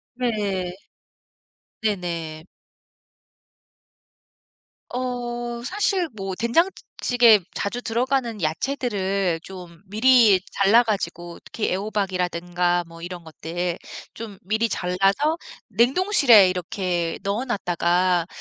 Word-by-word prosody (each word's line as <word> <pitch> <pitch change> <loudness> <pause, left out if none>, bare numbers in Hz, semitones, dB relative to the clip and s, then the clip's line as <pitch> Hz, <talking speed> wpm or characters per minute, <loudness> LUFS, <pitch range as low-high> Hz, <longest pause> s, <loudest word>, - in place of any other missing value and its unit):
네. 205 -7 -2 1.1
네네. 170 -7 -3 2.5
어 240 -1 -4
사실 375 - 0
뭐 195 -2 -4
된장찌 330 - +1 0.2
찌개 235 -3 +6 0.2
자주 240 +5 -3
들어가는 240 -2 -1
야채들을 195 - -1
좀 180 -3 -11
미리 220 -1 +5
잘라 205 +5 +4
가지고 175 -5 -4
특히 220 - -3
애호박이라든가 180 -3 -1
뭐 165 0 -13
이런 175 0 -7
것들 170 +2 -4 0.3
좀 215 -4 -8
미리 220 +4 0
잘라서 195 - +1 0.3
냉동실에 245 - +5
이렇게 180 -1 -2
넣어 200 +5 -1
놨다가 180 -4 +1
200 Hz, 200 characters per minute, -23 LUFS, 180-240 Hz, 2.5 s, 찌개